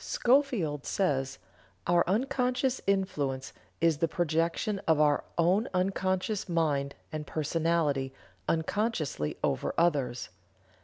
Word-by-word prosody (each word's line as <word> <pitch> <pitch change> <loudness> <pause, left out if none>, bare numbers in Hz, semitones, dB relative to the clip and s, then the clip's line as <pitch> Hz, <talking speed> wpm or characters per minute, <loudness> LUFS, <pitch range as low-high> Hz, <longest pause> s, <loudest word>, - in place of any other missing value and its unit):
Schofield 240 - +1
says: 135 -8 0 0.5
"Our 175 0 +4
unconscious 250 +4 0
influence 145 -9 -1 0.3
is 165 -3 +3
the 165 - +2
projection 170 +5 0
of 160 -2 +4
our 150 -1 +3
unconscious 190 +2 +1
mind 145 -5 0 0.2
and 155 -1 -5
personality 155 -3 0 0.4
unconsciously 160 - -1
over - - 0
others. 145 -7 +1
165 Hz, 95 wpm, -29 LUFS, 145-195 Hz, 0.5 s, Our